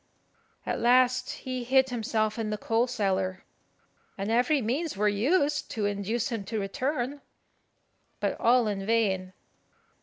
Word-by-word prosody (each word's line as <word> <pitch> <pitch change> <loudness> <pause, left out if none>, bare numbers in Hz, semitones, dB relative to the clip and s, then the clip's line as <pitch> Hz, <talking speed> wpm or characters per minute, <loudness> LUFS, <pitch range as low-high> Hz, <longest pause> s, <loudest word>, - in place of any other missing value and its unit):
At - - -2
last 255 +1 +3
he 255 -1 -4
hid 265 +2 +3
himself 220 -2 -1
in 220 -1 -2
the 210 - -2
coal 225 +3 +1
cellar, 190 -5 -1 0.7
and 200 +2 -2
every 250 +6 +3
means 265 - -2
were 210 +1 +2
used 285 - +1
to 215 -2 -1
induce 205 +4 -1
him 225 -4 -3
to 215 +2 -3
return, 255 +7 -2 1.0
but - - -1
all 240 -1 +4
in 200 -2 -2
vain. 195 -4 0
230 Hz, 140 wpm, -28 LUFS, 205-255 Hz, 1.0 s, all